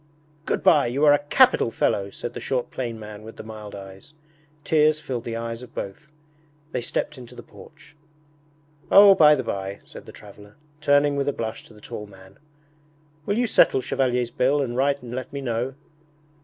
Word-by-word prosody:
'Good - - -1
bye, 150 -6 +5
you 135 +5 +1
are 145 - +7
a 145 - +3
capital 245 - +3
fellow!' 100 -3 0
said 120 - -7
the - - -6
short 125 -2 -3
plain 120 -3 -5
man 105 -1 -9
with 110 +1 -11
the - - -9
mild 110 -2 -9
eyes. 95 +8 -12 0.5
Tears 155 0 +3
filled 125 -6 -5
the 115 - -4
eyes 115 0 -5
of 125 - -13
both. 150 +11 -7 0.6
They 125 - -2
stepped 120 - -3
into 120 -2 -12
the - - -10
porch. 150 0 -17 0.9
'Oh, 200 0 +9
by 150 -4 +6
the 130 - -3
by,' 100 -2 -4
said - - -13
the - - -9
traveller, 105 0 -15 0.2
turning 145 -1 +3
with 140 0 -1
a 145 - +1
blush 110 0 -5
to 110 - -17
the 105 - -17
tall 105 0 -8
man, 95 -1 -17 0.9
'will 205 - 0
you 245 - +2
settle 210 - +4
Chevalier's 125 -2 -1
bill 135 +5 +1
and 125 -4 -2
write 140 +1 0
and 120 -1 -8
let 130 +1 -5
me 140 - -5
know?' 125 0 -3
125 Hz, 195 wpm, -24 LUFS, 110-145 Hz, 0.9 s, Oh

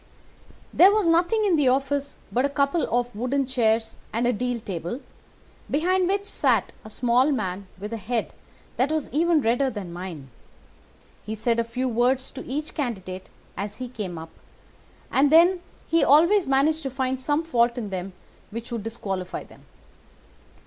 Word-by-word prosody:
"There 375 +3 +7
was 420 -4 +2
nothing 350 +7 +3
in 365 -5 +3
the 290 -3 +3
office 275 +2 0 0.2
but 250 - +1
a 280 - +2
couple 280 +3 +1
of 245 0 0
wooden 260 +5 0
chairs 230 -3 0
and 230 +2 0
a 245 - +3
deal 245 +2 -2
table, 185 +2 -5 0.7
behind 360 +5 +2
which 400 +1 0
sat 415 - +1
a 215 - -10
small 245 +5 +2
man 190 -7 -3
with 210 +4 -6
a - - -2
head 225 +2 -2 0.4
that 265 +4 +2
was 315 -2 -2
even 325 +1 +3
redder 245 +3 +2
than 195 -8 -6
mine. 170 -7 -7 0.9
He 220 - -5
said 230 +2 0
a - - +3
few 250 +3 -3
words 250 +2 +1
to 265 - -8
each 300 +4 -3
candidate 190 - -4 0.3
as 205 +2 -5
he 255 - -5
came 205 -8 -6
up, 160 0 -9 0.8
and 280 +2 +3
then 350 +3 +6 0.3
he 330 - +3
always 340 +7 +5
managed 285 +4 +2
to 275 - -3
find 260 0 -2
some 290 +4 0
fault 240 -6 +2
in 215 -5 -4
them 185 0 -4 0.4
which 230 +3 -7
would 235 -2 -3
disqualify 195 -4 -4
them. - - -18
250 Hz, 170 wpm, -25 LUFS, 220-290 Hz, 0.9 s, There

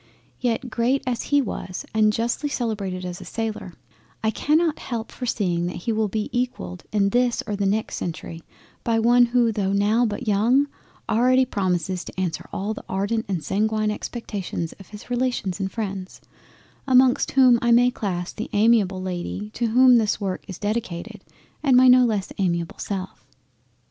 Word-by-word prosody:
Yet 245 0 -1
great 250 +5 +1
as 245 -2 -1
he 285 -1 +4
was, 185 -5 -5
and 215 -1 +4
justly 235 +7 -1
celebrated 200 -8 -3
as 180 -1 -6
a - - -7
sailor, 220 -5 -4 0.5
I 220 - +2
cannot 310 +5 +1
help 230 -2 -5
foreseeing 185 -9 -1
that 180 - -5
he 230 - +1
will 220 -1 +1
be 210 +1 -2
equalled 240 - -3
in 200 -2 +2
this 245 +2 +1
or 210 - -3
the 200 -1 0
next 215 +2 -1
Century 165 -1 -5 0.4
by 230 -1 +1
one 240 +2 +5
who 240 -1 +2
tho' 200 -3 -1
now 215 +4 +3
but 220 +3 -5
young, 235 +8 +3 0.4
already 255 +3 +3
promises 185 -5 -1
to - - -8
answer 175 -4 -3
all 205 +3 -2
the - - -9
ardent 220 +4 -1
and 180 -6 -2
sanguine 215 +1 0
expectations 205 -7 -5
of 195 - -13
his 210 +3 -12
Relations 245 -7 -1
and 190 -1 -2
Freinds, 195 -4 -5 0.7
amongst 255 -1 +4
whom 255 -3 +6
I 240 - +1
may 245 +1 +5
class 180 -6 -3
the 220 - -6
amiable 205 -4 +3
Lady 185 +3 -4
to 235 - -1
whom 250 +2 +6
this 215 -2 0
work 190 -2 -3
is 190 - -7
dedicated, 210 -1 -4 0.4
and 270 -4 +4
my 255 0 +7
no 250 0 +7
less 210 -5 -1
amiable 170 -3 -1
self. 190 -2 -5
215 Hz, 170 wpm, -23 LUFS, 190-245 Hz, 0.7 s, my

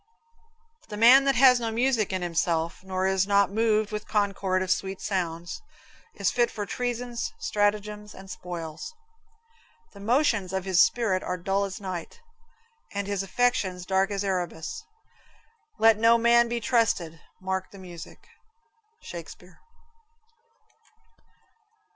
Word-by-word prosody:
The 210 - -6
man 250 +5 +7
that 275 - +2
has 250 0 +6
no 230 -1 -2
music 235 -2 +1
in 185 -1 -2
himself, 170 0 -1
Nor 190 0 -2
is 190 0 +1
not 200 -1 +3
moved 215 0 +1
with 210 0 -5
concord 195 -3 0
of 185 - -2
sweet 190 0 -1
sounds, 175 - -3 0.5
Is - - 0
fit 240 -1 +2
for 205 -2 -5
treasons, 245 - -3
stratagems 210 - -1
and 195 0 -12
spoils; 175 - -7 1.0
The 200 - -13
motions 215 -4 +1
of 190 -1 -2
his 185 -2 +4
spirit 210 -6 +2
are 180 - -3
dull 195 +3 0
as 190 -1 -6
night, 185 - -6 0.7
And 200 0 -3
his 200 -1 -2
affections 195 -4 0
dark 190 +1 +1
as 200 -1 -2
Erebus. 185 - -3 0.9
Let 220 -1 +5
no 230 +1 +6
such - - -5
man 235 0 +5
be 235 0 -2
trusted. 210 -9 0 0.2
Mark 190 0 -3
the 200 - -14
music. 175 -3 -11 0.7
Shakespeare. 180 +1 -10
200 Hz, 135 wpm, -26 LUFS, 185-230 Hz, 1.0 s, man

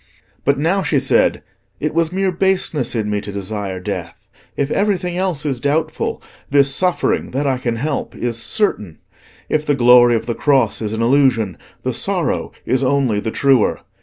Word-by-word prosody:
But 140 0 +2
now 170 +7 +1
she 150 -4 0
said, 135 - +2 0.4
"It 150 - -2
was 165 0 +1
mere 190 0 0
baseness 180 -8 0
in 110 -2 -1
me 105 -1 -1
to 100 - -7
desire 100 -1 -4
death. 90 -4 -6 0.3
If 140 0 -1
everything 185 -4 0
else 180 -5 -1
is 135 -4 -1
doubtful, 155 +3 -1 0.3
this 140 -1 +3
suffering 180 +4 0
that 140 +3 -1
I 130 -2 0
can 120 -2 -2
help 145 +5 -3
is 115 -1 -2
certain; 105 - 0 0.5
if 155 - 0
the 145 -1 +1
glory 120 -1 +6
of 115 0 -2
the 120 - -2
cross 130 -5 +1
is 105 -1 -3
an 110 +1 -1
illusion, 120 - +2 0.3
the - - -1
sorrow - - -2
is 130 - +1
only 130 -5 +1
the 110 - -3
truer. 135 -1 +2
135 Hz, 175 wpm, -18 LUFS, 115-155 Hz, 0.5 s, glory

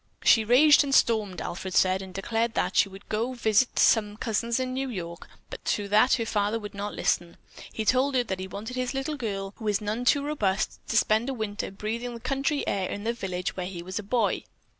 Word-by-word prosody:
She 225 - +6
raged 290 +7 +6
and 275 -1 +1
stormed, 215 -5 +2
Alfred 185 +1 -5
said, 185 0 +3
and 190 -1 -9
declared 225 +4 -1
that 180 - 0
she 200 - +4
would 195 +1 -13
go 230 +4 -2
to - - -15
visit 220 +3 +2
some 210 -2 +3
cousins 230 +2 -1
in 255 0 -2
New 265 +1 -2
York, 170 -6 -6 0.2
but - - -8
to 205 -1 0
that 215 +5 +5
her 230 - -2
father 210 0 0
would 210 -2 -8
not 205 +1 -5
listen. 170 -1 -1 0.3
He 220 - -4
told 260 +4 +2
her 250 - +3
that 190 -5 -4
he 190 - -5
wanted 210 +6 -7
his 255 +1 -2
little 270 +3 -2
girl, 200 -6 -4
who 220 - -6
is 205 -1 +2
none 215 +3 -3
too 285 +3 +3
robust, 215 -10 -1
to 225 - +1
spend 220 +4 +2
a 270 - -3
winter 215 -2 -3
breathing 230 +5 -4
the - - -8
country 275 +4 -1
air 190 -2 -1
in 205 - -5
the 230 +1 0
village 180 -5 -4
where 180 -1 -3
he 175 -2 -7
was 185 +3 -4
a - - -3
boy. 210 +1 0
215 Hz, 230 wpm, -27 LUFS, 195-245 Hz, 0.3 s, She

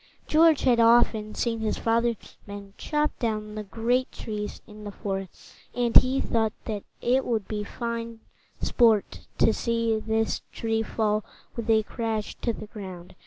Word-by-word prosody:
George 315 -1 +5
had 245 -2 +3
often 230 -2 +4
seen 230 -2 -1
his 220 -1 -1
father's 230 0 0
men 200 -1 -9
chop 300 -1 0
down 215 -2 -2
the 215 - -4
great 235 +5 0
trees 210 -1 -5
in 210 -1 -12
the 205 - -6
forest, 195 -2 -6 0.2
and 240 -1 0
he 260 +1 +5
thought 220 -2 0
that 210 -3 -3 0.2
it 255 +2 +2
would 220 -5 -1
be 210 -1 -3
fine 230 0 -5 0.4
sport 225 -4 +2
to 225 - +4
see 230 -1 0
this 220 0 0
tree 225 -1 -1
fall 215 -1 0 0.3
with 230 -1 -4
a 220 -1 +5
crash 220 -2 -3
to 235 - +1
the 215 - -7
ground. 190 -5 -9
225 Hz, 160 wpm, -26 LUFS, 210-235 Hz, 0.4 s, George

